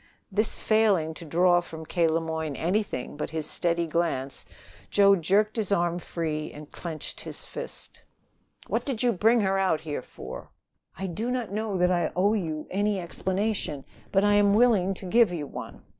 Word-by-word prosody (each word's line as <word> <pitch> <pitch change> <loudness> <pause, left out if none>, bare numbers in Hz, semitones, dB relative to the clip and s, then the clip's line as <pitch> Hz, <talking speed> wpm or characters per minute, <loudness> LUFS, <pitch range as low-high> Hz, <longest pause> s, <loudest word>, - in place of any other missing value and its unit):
This 210 +3 +1
failing 205 -8 +2
to 165 - -10
draw 175 +3 +4
from 160 -2 -9
K. 170 +1 +2
Le 160 +1 +2
Moyne 160 -2 -3
anything 180 - -1
but 150 - -4
his 160 -1 -3
steady 170 0 +1
glance, 160 -5 -2 0.4
Joe 200 -1 +6
jerked 200 +6 +2
his 210 -3 -1
arm 175 -2 +1
free, 155 -3 -3
and 150 0 -11
clenched 160 -3 -6
his - - -8
fist. - - -6 0.6
"What - - -1
did 260 -5 -2
you 245 - +4
bring 225 +5 +4
her 195 -1 +1
out 185 -5 +2
here 150 -4 -4
for?" 65 - -9 0.5
"I 195 - -3
do 205 +7 -3
not 250 -5 -2
know 210 -1 -2
that 180 0 +3
I 175 -3 +1
owe 200 +4 +3
you 160 -7 -2
any 205 +1 +1
explanation, 185 -3 -2 0.3
but 195 0 +3
I 205 0 +4
am 205 0 +5
willing 210 -5 +4
to 190 - -10
give 225 +1 +4
you 160 -4 -3
one. - - -8
180 Hz, 180 wpm, -27 LUFS, 160-205 Hz, 0.6 s, Joe